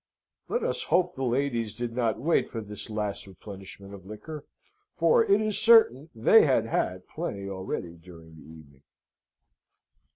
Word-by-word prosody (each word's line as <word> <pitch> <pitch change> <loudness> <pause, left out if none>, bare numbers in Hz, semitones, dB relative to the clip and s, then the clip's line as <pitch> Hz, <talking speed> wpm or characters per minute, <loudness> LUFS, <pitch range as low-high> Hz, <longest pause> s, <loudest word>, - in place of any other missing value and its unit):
Let 480 - -1
us - - -1
hope 180 0 +2
the 135 - -8
ladies 120 -4 -1
did 120 0 -5
not 115 -3 0
wait 165 +6 +1
for 115 - -5
this 105 -1 -8
last 105 -2 -4
replenishment 100 +1 -11
of 100 -2 -11
liquor, 140 - -9 0.5
for 475 -1 +4
it 400 -3 +3
is 215 -1 -1
certain 220 - +5
they 120 - +6
had 130 -6 +2
had 90 -4 -2
plenty 100 -12 -5
already 95 -3 -5
during 80 -1 -15
the 80 - -14
evening. 75 -3 -15
110 Hz, 155 wpm, -27 LUFS, 95-145 Hz, 0.5 s, they